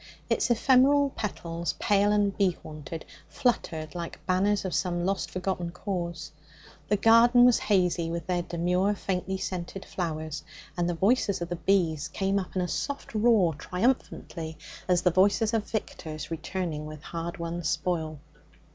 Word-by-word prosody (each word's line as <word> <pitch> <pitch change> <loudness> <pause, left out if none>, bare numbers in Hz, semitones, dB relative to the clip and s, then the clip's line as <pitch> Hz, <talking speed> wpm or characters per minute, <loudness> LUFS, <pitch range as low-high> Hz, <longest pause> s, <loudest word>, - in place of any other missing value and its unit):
Its - - +2
ephemeral 270 +4 +4
petals, 170 -6 -3
pale 205 0 +3
and 205 -1 +2
bee 190 -4 +2
haunted, 155 +1 -8 0.2
fluttered 160 - -1
like 170 -1 -7
banners 195 +2 +2
of 185 - -2
some 175 -1 0
lost, 195 +1 -1
forgotten 185 -2 -2
cause. 170 -2 -4 0.6
The 210 - +2
garden 235 +3 +6
was 245 -1 +5
hazy 180 -4 +1
with 170 -1 -4
their 180 -1 0
demure, 180 +4 0
faintly 190 0 -2
scented 185 0 -5
flowers, 155 -3 -4 0.3
and 175 0 0
the 175 - -1
voices 200 +1 +2
of 170 0 -4
the 175 - -2
bees 165 -3 +1
came 195 0 0
up 190 - -7
in 185 - +1
a - - -1
soft 280 +8 -4
roar 215 -6 +4
triumphantly, 170 - -2 0.3
as 180 -1 +2
the 180 - +4
voices 200 +5 +3
of 220 -2 -1
victors 160 -8 -5
returning 165 -2 -3
with 155 -1 -9
hardwon 170 0 -4
spoil. 160 0 -1
180 Hz, 150 wpm, -28 LUFS, 170-205 Hz, 0.6 s, garden